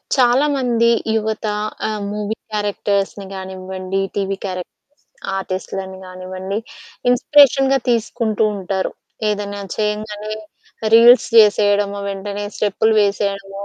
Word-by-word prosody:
చాలా 255 +2 +4
మంది 235 -3 +2 0.3
యువత 220 0 -2 0.4
ఆహ్, 215 -1 -3
మూవీ 210 +1 -3 0.2
క్యారెక్టర్స్‌ని 205 -1 -1
గానివ్వండి, 190 0 -5 0.2
టీవీ 195 -1 -1
క్యారెక్ 185 -2 -4 0.7
ఆర్టిస్టులని 190 0 -5
కానివ్వండి, 185 +2 -6 0.5
ఇన్స్పిరేషన్‌గా 270 +1 +5
తీసుకుంటూ 230 -2 0
ఉంటారు. 190 -1 -2 0.4
ఏదైనా 205 -1 -3 0.2
చేయంగానే 210 0 -3 0.6
రీల్స్ 235 +2 +7
చేసేయడం, 205 -2 +5 0.2
వెంటనే 200 +1 -4
స్టెప్పులు 215 +2 +1
వేసేయడం, 200 -1 -1
205 Hz, 90 wpm, -19 LUFS, 195-220 Hz, 0.7 s, రీల్స్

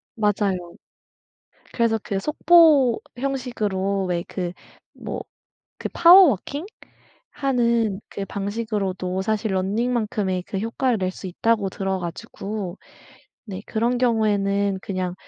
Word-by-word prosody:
맞아요. 205 -3 +1 1.2
그래서 230 -2 +2
그 195 - -2
속보 300 - +5 0.2
형식으로 210 -8 -1
왜 175 -1 -1
그 180 -2 -4 0.4
뭐 - - -5 0.6
그 - - -4
파워 350 +1 +8
워킹하는 245 - -2
그 200 - -5
방식으로도 195 -3 -3
사실 215 +1 -1
running만큼의 210 -1 0
그 195 - -5
효과를 230 +4 0
낼 185 0 -1
수 190 - -8
있다고 205 +2 0
들어 190 0 -2
가지고 190 +2 -6 0.7
네 195 -4 -6
그런 235 +3 0
경우에는 200 -4 +1
그냥 185 -2 -3
210 Hz, 250 characters per minute, -23 LUFS, 190-240 Hz, 1.2 s, 파워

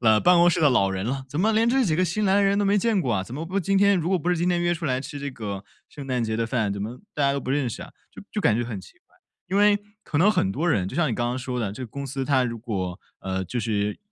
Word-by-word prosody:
呃， 110 -2 +5
办 180 +8 +5
公 175 +1 +6
室 175 -1 +1
的 145 - +6
老 100 -6 +3
人 95 0 -3
了， 135 +3 -3
怎 145 - -5
么 215 +5 +3
连 225 +2 +3
这 260 +1 +3
几 165 -7 +1
个 180 - +2
新 205 +5 -1
来 190 - +3
的 200 - +4
人 200 0 +2
都 205 - +2
没 200 +1 +3
见 225 -1 +1
过 130 -9 0
啊？ 95 - 0
怎 115 +6 -9
么 155 +4 -4
不 190 +4 -1
今 195 +2 +1
天 200 -1 +4
如 170 - -1
果 190 0 +2
不 175 +2 -1
是 180 - +2
今 175 +2 +1
天 175 - +2
约 175 - +2
出 165 -2 -3
来 130 -1 +1
吃 145 +2 -7
这 140 0 -4
个 105 -6 -6 0.3
圣 140 -2 -9
诞 125 -3 0
节 110 - -2
的 115 +1 0
饭， 110 -3 0
怎 100 - -5
么 115 +4 -6 0.2
大 145 - -1
家 140 0 +3
都 - - -1
不 130 - -5
认 135 -2 +1
识 115 - -6
啊？ - - -11 0.2
就 - - -12
就 210 - -1
感 110 - +3
觉 120 - -1
很 115 -5 -5
奇 90 - -15
怪。 - - -32 0.3
因 190 - -1
为 205 0 +5 0.2
可 - - -4
能 195 +8 +5
很 95 - +1
多 150 - -2
人， 100 - +1
就 - - -7
像 155 -6 +2
你 - - -1
刚 120 +1 -1
刚 125 +1 -2
说 125 -1 -3
的， 105 - -1
这 105 +6 -7
个 125 - -5
公 140 +5 -6
司 135 0 -3
它 135 -2 +3
如 115 -2 -3
果 95 -5 -4 0.2
呃， 95 0 -3
就 120 +6 -3
是 105 -2 -1
135 Hz, 360 characters per minute, -24 LUFS, 115-175 Hz, 0.3 s, 公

